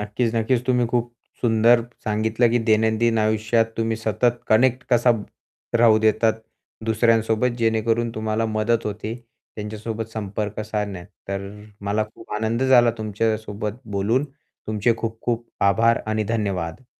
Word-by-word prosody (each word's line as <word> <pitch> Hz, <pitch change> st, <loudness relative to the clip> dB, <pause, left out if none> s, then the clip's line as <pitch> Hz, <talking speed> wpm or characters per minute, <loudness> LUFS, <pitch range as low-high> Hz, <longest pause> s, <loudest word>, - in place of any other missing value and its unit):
नक्कीच, 110 Hz, +3 st, -1 dB
नक्कीच. 115 Hz, +2 st, +1 dB
तुम्ही 125 Hz, -1 st, +2 dB
खूप 120 Hz, -1 st, 0 dB, 0.3 s
सुंदर 115 Hz, 0 st, +4 dB, 0.2 s
सांगितलं 110 Hz, +2 st, +1 dB
की 120 Hz, -, +2 dB
दैनंदिन 110 Hz, +1 st, +3 dB
आयुष्यात 110 Hz, +1 st, +1 dB
तुम्ही 115 Hz, 0 st, 0 dB
सतत 115 Hz, +2 st, 0 dB
कनेक्ट 125 Hz, +3 st, +3 dB
कसा 120 Hz, +1 st, +5 dB, 0.7 s
राहू 110 Hz, -2 st, +6 dB
देतात 110 Hz, +1 st, +3 dB, 0.5 s
दुसऱ्यांसोबत 115 Hz, +1 st, +2 dB
जेणेकरून 115 Hz, +1 st, +1 dB
तुम्हाला 110 Hz, +1 st, -1 dB
मदत 110 Hz, +1 st, 0 dB
होते, 105 Hz, +1 st, -4 dB, 0.4 s
त्यांच्यासोबत 110 Hz, +1 st, -5 dB
संपर्क 105 Hz, 0 st, -4 dB
साधण्यात. 105 Hz, -4 st, -4 dB, 0.2 s
तर 100 Hz, 0 st, -3 dB
अ, 105 Hz, 0 st, -12 dB, 0.2 s
मला 105 Hz, +2 st, 0 dB
खूप 115 Hz, -, -12 dB
आनंद 110 Hz, +3 st, -1 dB
झाला 125 Hz, -3 st, +5 dB
तुमच्यासोबत 110 Hz, 0 st, -2 dB, 0.2 s
बोलून, 115 Hz, +8 st, +1 dB, 0.4 s
तुमचे 110 Hz, +2 st, +1 dB
खूप-खूप 115 Hz, +1 st, -3 dB, 0.2 s
आभार 115 Hz, +3 st, +3 dB
आणि 110 Hz, 0 st, 0 dB
धन्यवाद 100 Hz, 0 st, -3 dB
110 Hz, 125 wpm, -23 LUFS, 110-115 Hz, 0.7 s, राहू